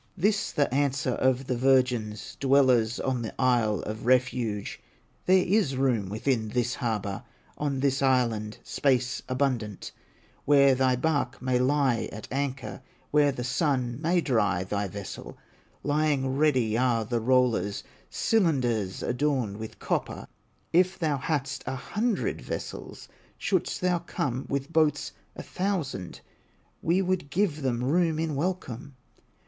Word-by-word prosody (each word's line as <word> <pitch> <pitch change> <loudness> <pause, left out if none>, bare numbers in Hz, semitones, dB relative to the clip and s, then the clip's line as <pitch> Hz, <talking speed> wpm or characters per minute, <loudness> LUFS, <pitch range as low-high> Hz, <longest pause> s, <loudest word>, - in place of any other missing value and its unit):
This 205 +3 +1
the 145 -4 0
answer 135 -2 +1
of 130 +1 +1
the 125 - -1
virgins, 125 -5 +1
Dwellers 130 -4 +3
on 130 -2 -1
the 115 - -6
Isle 120 -5 +2
of 110 +2 -6
Refuge: 125 -5 0 0.5
"There 185 0 +5
is 190 -8 +2
room 120 -8 +1
within 110 +2 0
this 125 +2 0
harbor, 105 -6 -3 0.4
On 140 -3 -1
this 140 0 +1
island, 115 -5 +1
space 125 -3 0
abundant, 130 -6 -1 0.5
Where 140 -1 +6
thy 130 0 +2
bark 135 -1 -1
may 130 -1 +1
lie 130 -2 +1
at 105 0 -8
anchor, 135 -1 -3 0.3
Where 145 -1 +4
the 125 -2 -5
sun 125 -1 0
may 170 +2 +2
dry 105 - +1
thy 100 +1 -2
vessel; 100 0 -8 0.5
Lying 145 -3 +1
ready 130 -7 +2
are 120 -2 +2
the 120 +2 -1
rollers, 120 -4 +1 0.3
Cylinders 125 - +1
adorned 125 -5 0
with 110 0 -8
copper; - - -2 0.5
If 185 +2 +3
thou 155 -5 0
hadst 140 0 -2
a - - -2
hundred 210 - -1
vessels, - - -6 0.3
Shouldst - - -1
thou 180 -1 +2
come 135 -6 -3
with 140 +3 -3
boats 150 -3 +2 0.2
a - - -7
thousand, 175 - -3 0.6
We 180 +4 +2
would 185 -5 -1
give 165 -2 0
them 125 -3 -1
room 160 +3 +2
in 160 -1 -1
welcome." 140 -5 -3
130 Hz, 135 wpm, -27 LUFS, 120-150 Hz, 0.6 s, Where